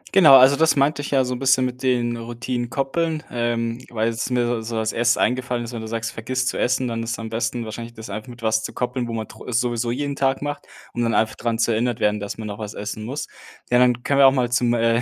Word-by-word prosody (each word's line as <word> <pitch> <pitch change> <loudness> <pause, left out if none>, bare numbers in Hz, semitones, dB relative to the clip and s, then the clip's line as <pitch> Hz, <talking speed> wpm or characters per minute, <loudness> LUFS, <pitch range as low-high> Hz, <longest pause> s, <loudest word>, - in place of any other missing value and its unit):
Genau, 160 -8 +9
also 130 +2 +7
das 160 +2 +3
meinte 145 +1 +2
ich 145 - -5
ja 135 -2 +2
so 125 - -2
'n 125 - -5
bisschen 130 -1 +3
mit 125 0 -5
den 120 -2 +1
Routinen 120 +1 -4
koppeln. 155 +4 -1
Ähm, 120 0 -2
weil 115 0 0
was 115 +2 -3
mir 120 -2 0
so 115 0 -4
als 110 0 0
Erstes 120 0 +2
eingefallen 125 -1 0
ist: 120 +1 -7
Wenn 115 - -5
du 110 - -6
sagst, 115 0 -3
du - - -18
vergisst 130 +3 -2
zu - - -4
essen, 130 0 +1
dann 115 -1 -3
ist 115 0 -3
am 110 0 -6
besten 115 +1 -2
wahrscheinlich 115 +2 -7
das 110 0 -9
einfach 110 +3 -6
mit 120 -1 -12
was 110 0 +2
zu - - -6
koppeln, 125 -1 -2
wo 115 - -5
man 110 -1 -3
tro 110 - -13
es 125 -1 +1
sowieso 120 -1 -1
jeden 140 +3 -2
Tag 135 0 0
macht, 145 0 -5 0.3
um 120 - -2
dann 115 -1 +1
einfach 110 - +2
dran 115 -1 -2
zu 115 0 +2
erinnert 120 +1 0
werden, 105 0 +1
dass 100 +1 -5
man 110 -1 -6
noch 105 +1 -6
was 105 -1 -6
essen 105 +1 -5
muss. 135 +6 -4 0.5
Ja, 125 - +5
dann 125 -1 +3
können 140 -1 +1
wir 135 - +9
auch 135 - +6
mal 125 -2 0
zum 120 -1 +2
äh, 115 0 +2
120 Hz, 275 wpm, -22 LUFS, 115-130 Hz, 0.5 s, Genau